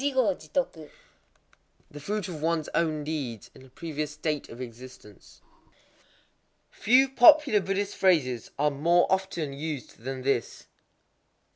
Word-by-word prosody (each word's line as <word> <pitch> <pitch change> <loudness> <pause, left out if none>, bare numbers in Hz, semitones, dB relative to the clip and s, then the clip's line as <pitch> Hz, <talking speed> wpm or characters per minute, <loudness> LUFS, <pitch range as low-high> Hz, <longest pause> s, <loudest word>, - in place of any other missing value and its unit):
_ 255 - -1 1.0
The 145 - -9
fruit 205 +4 -3
of 165 -5 -7
ones 160 -1 0
own 155 -3 0
deeds 140 -8 -5
[in - - -16
a 130 - -17
previous 155 +1 -5
state 150 0 -4
of 115 - -11
existence]. 125 -3 -12 1.3
Few 255 +4 +4
popular 270 -2 +6
Buddhist 195 +2 -2
phrases 135 - +1
are 150 +1 +2
more 170 +5 +3
often 190 -6 -1
used 145 -3 -6
than 130 +2 -6
this. 125 -5 -2
155 Hz, 120 wpm, -27 LUFS, 135-190 Hz, 1.3 s, popular